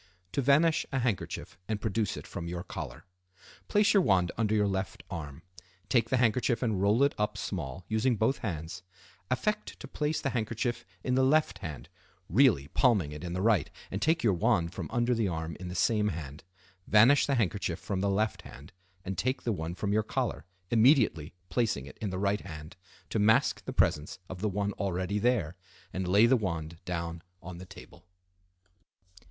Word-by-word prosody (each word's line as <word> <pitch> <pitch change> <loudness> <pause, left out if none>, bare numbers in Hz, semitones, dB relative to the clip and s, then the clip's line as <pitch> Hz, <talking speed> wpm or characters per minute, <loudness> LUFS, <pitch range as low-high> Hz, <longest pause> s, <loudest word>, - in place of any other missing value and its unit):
To 140 - 0
Vanish 150 +5 +4
a 135 - -1
Handkerchief 120 -8 -2
and 110 -2 -2
Produce 110 0 -1
it - - -8
from 85 - -6
your 85 0 -4
Collar.—Place 90 - -3
your 200 - +6
wand 95 - +3
under 110 -1 +1
your 105 -1 +3
left 95 0 -3
arm. 75 -5 -6 0.5
Take 115 -3 +2
the 130 - +2
handkerchief 120 +1 +2
and 110 -6 0
roll 105 +6 +4
it 140 - +3
up 105 0 0
small, 85 -3 -5
using 115 +3 +1
both 110 +6 +1
hands. 80 -7 -5 0.5
Affect 210 +11 -1
to - - -8
place 150 +1 -1
the 135 - -2
handkerchief 120 +1 -2 0.2
in 125 - 0
the 130 +1 +3
left 130 -9 +2
hand, 80 -7 -7 0.4
really 105 - +4
palming 105 - +2
it 75 +2 -8
in 85 -1 -4
the 90 +1 -2
right, 105 -8 +3 0.2
and 95 - -3
take 160 +6 +2
your 110 -4 +4
wand 90 -3 +1
from 90 -5 -5
under 120 +1 +1
the 115 -3 +1
arm 80 -2 -3
in 90 - -6
the 90 - -6
same 105 +3 +2
hand. 75 -6 -5 0.4
Vanish 115 +7 +6
the 140 - +2
handkerchief 100 -6 0
from 100 -3 -3
the 100 - +1
left 105 +2 0
hand, 70 +8 -13 0.3
and 95 0 -3
take 130 +2 -1
the 115 - 0
one 80 -1 -4
from 100 +1 -1
your 110 - +3
collar, 105 - -2 0.3
immediately 115 - +4
placing 110 - 0
it 70 - -13
in 105 - -1
the 95 - -4
right 100 +1 0
hand 80 -3 -9 0.4
to 110 - 0
mask 110 +6 +3
the - - -4
presence 75 +1 +1
of 95 -1 -8
the 105 - +1
one 100 +1 -1
already 95 +1 -1
there, 105 -8 +1 0.4
and 95 -1 -2
lay 100 +5 +6
the 125 +3 +5
wand 85 -7 -3
down 85 -2 -4 0.2
on 85 0 -9
the 90 - -10
table. - - -14
100 Hz, 190 wpm, -30 LUFS, 90-120 Hz, 0.5 s, your